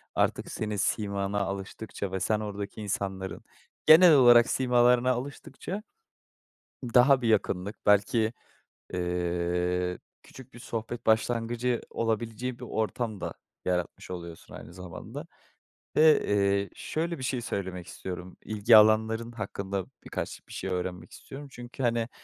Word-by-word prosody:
artık - - 0
senin 105 -1 -3
simana 100 0 -1
alıştıkça 100 0 -4
ve 95 - -2
sen 105 +3 +1
oradaki 105 0 -5
insanların 95 -3 -3 0.5
genel 165 +2 +9
olarak 120 -3 +7
simalarına 125 0 +3
alıştıkça 140 - -5 1.1
daha 130 +2 +6
bir 120 - 0
yakınlık, 100 -1 0
belki, 105 +2 +3 0.6
eee, 90 0 -1 0.2
küçük 130 -1 -14
bir 120 - -12
sohbet 115 +1 -5
başlangıcı 120 +2 +1
olabileceği 115 +2 -2
bir - - -9
ortam 110 -2 -2
da - - -4 0.3
yaratmış 90 +2 -2
oluyorsun 85 -2 -8
aynı 85 - -11
zamanda. 90 -2 -8 0.7
Ve, 155 0 +6
eee, 100 0 +2
şöyle 170 +1 -3
bir 130 - -7
şey 125 -1 -1
söylemek 95 -5 -4
istiyorum, 90 0 -7
ilgi 110 +1 +5
alanların 110 +2 +4
hakkında 100 -3 -4 0.2
birkaç - - -5
bir - - -12
şey - - -4
öğrenmek 90 -1 -4
istiyorum 140 +1 -10
çünkü 120 +1 -8
hani, 115 -1 +1
110 Hz, 125 wpm, -28 LUFS, 95-120 Hz, 1.1 s, genel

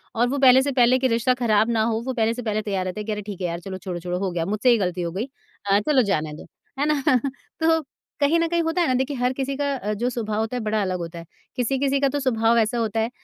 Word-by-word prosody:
और 235 +2 +2
वो 280 - -1
पहले 260 -1 +7
से 280 +1 -1
पहले 250 -1 +4
के 260 - +2
रिश्ता 235 +2 +2
ख़राब 215 -1 +3
ना 225 -2 +2
हो 220 - -1
वो 260 - -2
पहले 225 -2 +1
से 245 - -6
पहले 215 -2 -1
तैयार 195 -3 -2
रहते 185 +3 -4
हैं - - -7
कि 220 - -3
अरे 210 0 -3
ठीक 200 -2 -8
है 180 - 0
यार! 170 0 -4
चलो 190 +1 -7
छोड़ो-छोड़ो 180 -1 -4
हो 195 -1 -1
गया 170 -1 -2
मुझसे 210 +6 +1
ही 240 - +5
ग़लती 180 -3 -1
हो 170 -1 -2
गई 195 +7 -3 0.4
अ, 200 0 +4
चलो 265 +5 +3
जाने 155 -4 -1
दो। 150 - -11 0.3
है 285 - +2
ना 285 -2 -2 0.6
तो 325 0 +3 0.4
कहीं 295 +3 +3
न 335 - +1
कहीं 340 0 +1
होता 325 +2 0
है 340 - +2
ना 255 - +2
देखिए 265 +3 -1
हर 250 +1 +1
किसी 275 +1 -3
का 285 -1 0
अ, 210 -5 -3
जो 235 +4 -1
स्वभाव 220 -3 -3
होता 220 +3 -2
है - - -3
बड़ा 215 0 0
अलग 185 -2 -1
होता 170 0 -6
है। 165 - -10 0.3
किसी-किसी 270 +3 0
का 275 - +3
तो 290 +2 -2
स्वभाव 230 -3 +2
ऐसा 225 +1 +1
होता 225 -1 -1
है 225 +1 0
225 Hz, 290 wpm, -23 LUFS, 200-265 Hz, 0.6 s, पहले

